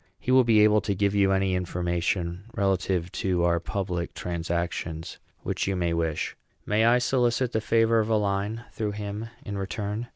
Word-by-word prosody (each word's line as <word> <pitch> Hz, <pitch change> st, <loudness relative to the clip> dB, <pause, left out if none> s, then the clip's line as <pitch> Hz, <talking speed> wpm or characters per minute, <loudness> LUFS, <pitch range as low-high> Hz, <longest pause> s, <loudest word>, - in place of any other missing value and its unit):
He 125 Hz, -, -2 dB
will 130 Hz, 0 st, +7 dB
be 115 Hz, -3 st, +5 dB
able 105 Hz, 0 st, +5 dB
to 100 Hz, -2 st, -1 dB
give 100 Hz, +1 st, +1 dB
you 100 Hz, -1 st, +3 dB
any 95 Hz, -1 st, +2 dB
information, 90 Hz, 0 st, -1 dB
relative 95 Hz, -3 st, 0 dB
to 90 Hz, -2 st, 0 dB
our 85 Hz, -1 st, +3 dB
public 90 Hz, -1 st, -3 dB
transactions, 85 Hz, -1 st, -3 dB, 0.2 s
which -, -, -2 dB
you 95 Hz, -, 0 dB
may 85 Hz, -2 st, 0 dB
wish. 80 Hz, -2 st, -1 dB, 0.3 s
May 105 Hz, +2 st, +2 dB
I 120 Hz, +1 st, +6 dB
solicit 125 Hz, 0 st, +1 dB
the 110 Hz, -, 0 dB
favor 115 Hz, +1 st, +3 dB
of 110 Hz, 0 st, 0 dB
a 110 Hz, -, +3 dB
line, 105 Hz, +2 st, -1 dB
through 105 Hz, -3 st, -2 dB
him, 105 Hz, +2 st, -5 dB, 0.2 s
in 100 Hz, -1 st, -4 dB
return? 105 Hz, +3 st, -3 dB
100 Hz, 175 wpm, -26 LUFS, 90-110 Hz, 0.3 s, will